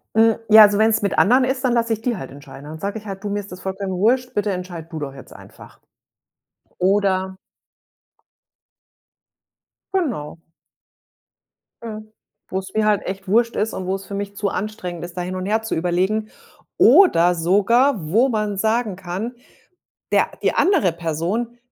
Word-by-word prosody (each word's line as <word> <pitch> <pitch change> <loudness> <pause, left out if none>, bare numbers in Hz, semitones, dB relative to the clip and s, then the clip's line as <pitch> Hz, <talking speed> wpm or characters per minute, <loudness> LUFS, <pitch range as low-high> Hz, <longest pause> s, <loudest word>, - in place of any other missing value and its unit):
Hm, 225 0 +5
ja, 220 0 +9
also, 205 -1 +6
wenn's 220 0 +3
mit 200 - -1
anderen 250 +5 +5
ist, 260 +1 -1
dann 245 - +2
lasse 230 -1 0
ich 220 - -1
die 240 0 -1
halt 135 -9 -8
entscheiden. 140 0 -12
Dann 155 +2 -9
sage 200 +5 -3
ich 215 - -19
halt: 195 -1 -7
„Du, - - -3
mir 205 0 -1
ist 200 - -14
das 180 - -9
vollkommen 190 0 -4
wurscht, 250 +6 +1
bitte 205 0 -1
entscheid 180 -3 -6
du 160 - -6
doch 140 -2 -5
jetzt 135 - -13
einfach.“ - - -15 1.0
Oder 190 0 +1 2.6
Genau. 235 - -2 1.5
Mhm, 215 -1 -8 0.4
wo's 190 0 -5
mir 215 0 +1
halt 210 -2 +1
echt 190 0 -6
wurscht 230 +4 +2
ist 220 +2 -1
und 185 - -5
wo's 195 +1 -3
für 200 - -9
mich 200 0 -5
zu 200 0 -1
anstrengend 185 -5 -5
ist, 175 +1 -12
da - - -1
hin 180 +1 -4
und 185 0 -4
herzuüberlegen. 215 0 0 0.5
Oder 180 - +6
sogar, 200 - +2
wo 240 +7 +4
man 210 -3 -2
sagen 220 -1 0
kann, 195 +6 -5 0.8
der - - +3
die - - +1
andere 355 - +3
Person, 170 +9 -3
200 Hz, 165 wpm, -21 LUFS, 180-220 Hz, 2.6 s, ja